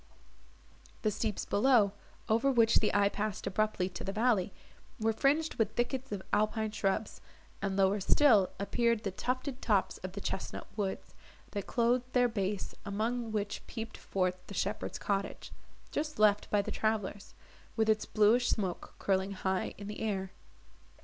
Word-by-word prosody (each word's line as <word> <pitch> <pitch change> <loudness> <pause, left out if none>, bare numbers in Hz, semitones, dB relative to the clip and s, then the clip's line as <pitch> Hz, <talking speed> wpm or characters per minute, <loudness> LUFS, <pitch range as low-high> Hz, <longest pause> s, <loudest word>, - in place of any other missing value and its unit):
The 215 - +2
steeps 210 0 -2
below, 215 -2 +4 0.4
over 230 +5 +3
which 230 -3 +5
the 215 - +1
eye 200 0 +4
passed 210 -1 -3
abruptly 195 -1 0
to 180 - -7
the 195 - -2
valley, 215 -3 +2 0.5
were 225 0 +2
fringed 290 +7 +2
with 220 -1 +1
thickets 260 +2 -1
of 200 -2 -3
alpine 215 +1 +1
shrubs; 205 0 -1 0.4
and, 195 -1 -1
lower 195 +1 +3
still, 215 -2 +5
appeared 235 +2 +1
the 195 - -1
tufted 255 +6 -3
tops 205 -4 +1
of 185 0 -6
the 200 - -5
chesnut 190 - -4
woods, 200 -3 -3 0.4
that 200 -3 -4
clothed 245 +1 +1
their 245 -1 +5
base, 200 -3 -2
among 225 +3 -2
which 205 -1 -2
peeped 225 -1 -6
forth 185 -1 -1
the 200 - -8
shepherd's 200 +3 -2
cottage, 200 -1 -3 0.4
just 305 0 -2
left 210 -1 +4
by 205 -1 +2
the - - -5
travellers, 210 -2 -2 0.4
with 220 -1 +2
its 215 0 +2
bluish 225 +4 +4
smoke 190 -5 -2
curling 190 0 0
high 190 -1 -1
in 200 - -8
the 210 +1 -6
air. 195 -4 -2
215 Hz, 155 wpm, -32 LUFS, 200-230 Hz, 0.5 s, which